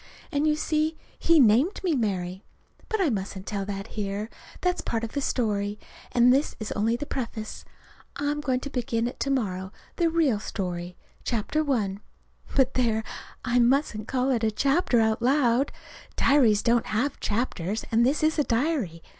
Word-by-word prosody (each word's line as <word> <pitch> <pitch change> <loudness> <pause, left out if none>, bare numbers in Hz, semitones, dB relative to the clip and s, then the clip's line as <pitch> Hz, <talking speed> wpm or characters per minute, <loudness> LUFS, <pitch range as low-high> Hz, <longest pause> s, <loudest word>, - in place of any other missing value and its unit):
And 290 0 +1
you 305 - +3
see, 310 +1 0 0.2
he 335 -1 +5
named 255 - +4
me 355 -3 +2
Mary 190 -6 -2 0.5
But 440 - 0
I 325 -7 +3
mustn't 195 -2 -4
tell 200 -2 -3
that 195 -1 -4
here. 210 +1 -4 0.3
That's 360 0 +1
part 225 -1 -2
of 225 - -3
the 285 - -2
story, 210 -5 -1 0.3
and 245 +1 +5
this 280 +3 +1
is 215 - -5
only 225 +3 +1
the 280 +5 -4
Preface. 230 -5 -5 0.5
I'm 290 +1 -1
going 260 -3 0
to 285 - -6
begin 235 -2 -1
it 245 - -7
to 275 - -1
morrow 190 -8 -1 0.3
the 340 -1 +3
real 315 -10 +2
story 180 -4 -4 0.3
Chapter 245 +7 0
One. 210 -9 0 0.6
But, 265 -1 +3
there 225 -3 +1 0.4
I 245 -1 +2
mustn't 240 -3 +2
call 260 +1 +1
it 235 -3 0
a 220 - +3
"chapter" 270 +3 +2
out 220 0 +2
loud. 255 0 +3 0.4
Diaries 235 -8 +4
don't 235 0 +2
have 245 +7 -1
chapters, 210 -3 -2
and 230 +1 +4
this 275 +5 +2
is 315 0 +2
a - - +4
diary. 235 - -1
235 Hz, 170 wpm, -26 LUFS, 210-280 Hz, 0.6 s, he